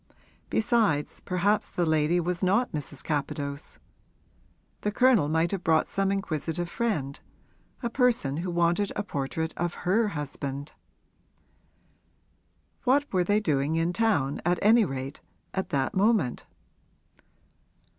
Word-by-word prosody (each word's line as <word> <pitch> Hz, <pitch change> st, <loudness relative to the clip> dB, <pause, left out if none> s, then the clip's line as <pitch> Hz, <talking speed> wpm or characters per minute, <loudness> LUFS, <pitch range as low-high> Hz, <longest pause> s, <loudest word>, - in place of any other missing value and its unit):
Besides, 215 Hz, -10 st, +1 dB
perhaps 195 Hz, +4 st, 0 dB
the 175 Hz, -, -1 dB
lady 160 Hz, +2 st, +2 dB
was 175 Hz, +1 st, -2 dB
not 200 Hz, +7 st, +2 dB
Mrs. 145 Hz, -2 st, -5 dB
Capadose; 145 Hz, -1 st, -3 dB, 1.0 s
the 210 Hz, -, 0 dB
Colonel 230 Hz, -, +4 dB
might 160 Hz, +2 st, +1 dB
have 195 Hz, -2 st, -3 dB
brought 160 Hz, -1 st, +3 dB
some 195 Hz, 0 st, 0 dB
inquisitive 175 Hz, -3 st, -2 dB
friend, 170 Hz, -, -2 dB, 0.6 s
a 235 Hz, -, 0 dB
person 235 Hz, -, +2 dB
who 175 Hz, +3 st, -3 dB
wanted 175 Hz, +3 st, +1 dB
a 205 Hz, -, -1 dB
portrait 160 Hz, -1 st, -3 dB
of 175 Hz, 0 st, -3 dB
her 215 Hz, +5 st, +3 dB
husband. 140 Hz, 0 st, -5 dB, 2.1 s
What 280 Hz, +1 st, +2 dB
were 180 Hz, -1 st, +3 dB
they 205 Hz, +4 st, +2 dB
doing 150 Hz, -5 st, 0 dB
in 165 Hz, +2 st, +1 dB
town, 165 Hz, -11 st, +1 dB
at 175 Hz, +1 st, +2 dB
any 220 Hz, +2 st, +6 dB
rate, 135 Hz, -2 st, -5 dB, 0.3 s
at 190 Hz, -, -2 dB
that 135 Hz, -2 st, 0 dB
moment? 195 Hz, -, +1 dB
175 Hz, 125 wpm, -27 LUFS, 150-205 Hz, 2.1 s, any